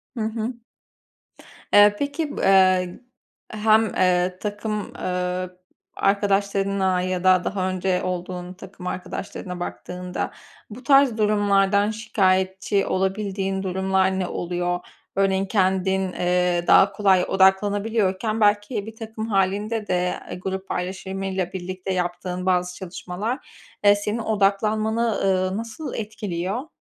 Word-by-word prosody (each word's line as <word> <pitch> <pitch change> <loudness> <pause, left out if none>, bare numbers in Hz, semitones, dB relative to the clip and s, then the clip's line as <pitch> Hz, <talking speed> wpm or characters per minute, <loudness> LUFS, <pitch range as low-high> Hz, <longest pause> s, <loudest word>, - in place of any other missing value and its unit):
Hı - - -5
hı. 220 +2 -2 1.2
Eee, 205 0 +7
peki 285 +1 -2
b - - -5
eee, 185 -2 +4 0.5
hem, 215 0 +3
eee, 180 0 +2
takım, 210 0 -4
eee, 180 0 -2 0.5
arkadaşlarına 195 -2 +1
ya 185 0 -2
da 185 -1 +5
daha 190 -2 -1
önce 185 0 -1
olduğun 180 0 -4
takım 185 -1 -10
arkadaşlarına 185 0 -5
baktığında, 180 +1 -5 0.4
bu 235 +4 -10
tarz 275 -3 +5
durumlardan 205 -1 +3
şikâyetçi 195 -2 +1
olabildiğin 195 0 -1
durumlar 190 0 +1
ne 185 - -1
oluyor? 175 0 -2 0.4
Örneğin 195 0 +2
kendin, 190 -1 +1
eee, 180 -1 +1
daha 195 - +6
kolay 195 -2 +3
odaklanabiliyorken 205 +2 +2
belki 205 +1 +2
bir 220 0 -9
takım 220 0 -6
hâlinde 205 +2 0
de, 180 -1 0 0.2
eee, - - -3
grup 190 +1 -5
paylaşımıyla 190 0 -3
birlikte 185 +1 -4
yaptığın 180 0 -3
bazı 180 -1 +1
çalışmalar, 190 +7 -5 0.3
eee, 205 0 +7
senin 210 +2 -2
odaklanmanı, 215 +2 +1
ııı, 185 0 +1
nasıl 230 +6 -6
etkiliyor? 210 - -4
195 Hz, 115 wpm, -23 LUFS, 185-210 Hz, 1.2 s, Eee